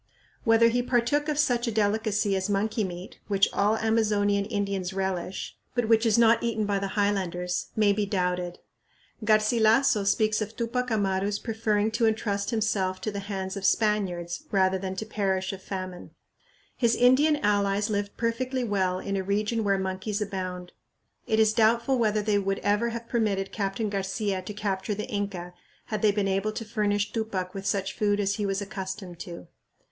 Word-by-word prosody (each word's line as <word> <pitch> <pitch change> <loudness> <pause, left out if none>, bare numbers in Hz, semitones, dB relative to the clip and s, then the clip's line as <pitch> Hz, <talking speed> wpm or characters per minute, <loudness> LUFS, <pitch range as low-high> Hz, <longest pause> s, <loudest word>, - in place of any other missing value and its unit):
Whether 225 0 +5
he 245 +1 +1
partook 250 +5 +1
of 300 - -1
such 245 -5 +2
a - - 0
delicacy 210 -1 +1
as 190 +1 -1
monkey 210 +3 0
meat, 180 0 -7
which 200 -1 +3
all 210 +2 +2
Amazonian 210 -3 +2
Indians 200 -3 -2
relish, 190 -1 -3 0.2
but 240 -2 +1
which 225 +1 +4
is 220 - +3
not 230 0 +5
eaten 225 -2 -1
by 200 -1 0
the 195 +1 -4
highlanders, 180 -3 0
may 210 -2 +4
be 205 0 -1
doubted. 180 -2 -1 0.7
Garcilasso 215 +2 +4
speaks 215 +1 +2
of 215 +1 -4
Tupac 250 +2 -2
Amaru's 200 -2 0
preferring 220 -1 0
to 230 0 +2
entrust 205 -2 -1
himself 200 -4 0
to 215 - -2
the 200 - -4
hands 195 -1 -4
of 200 - -4
the 195 - +5
Spaniards 185 -6 -1
"rather 190 -1 +2
than 190 0 -4
to 220 - -4
perish 195 -3 -1
of 190 - -8
famine." 185 -2 -6 0.7
His 235 -2 +2
Indian 260 +5 +5
allies 205 -1 +1
lived 205 0 -2
perfectly 250 +3 -1
well 190 -5 0
in 195 +1 -3
a 195 - 0
region 210 +4 0
where 200 -1 +2
monkeys 190 +2 -3
abound. 185 -3 -4 0.6
It 220 - +2
is 220 -1 +4
doubtful 235 +3 +3
whether 215 -2 +2
they 205 -1 +2
would 195 0 -1
ever 210 +3 +2
have 230 0 -6
permitted 205 -5 0
Captain 205 +1 -2
Garcia 195 0 -2
to 195 +3 -7
capture 205 0 -2
the 210 - -4
Inca 195 -4 -4 0.4
had 210 - -1
they 215 - +5
been 200 -1 0
able 195 +2 0
to 225 - -5
furnish 210 -2 0
Tupac 195 -5 -3
with 195 -1 -5
such 195 -1 -1
food 205 -1 +1
as 200 +1 0
he 205 -2 -1
was 195 +1 -1
accustomed 190 -3 -6
to. 170 -1 -8
205 Hz, 180 wpm, -27 LUFS, 195-220 Hz, 0.7 s, Whether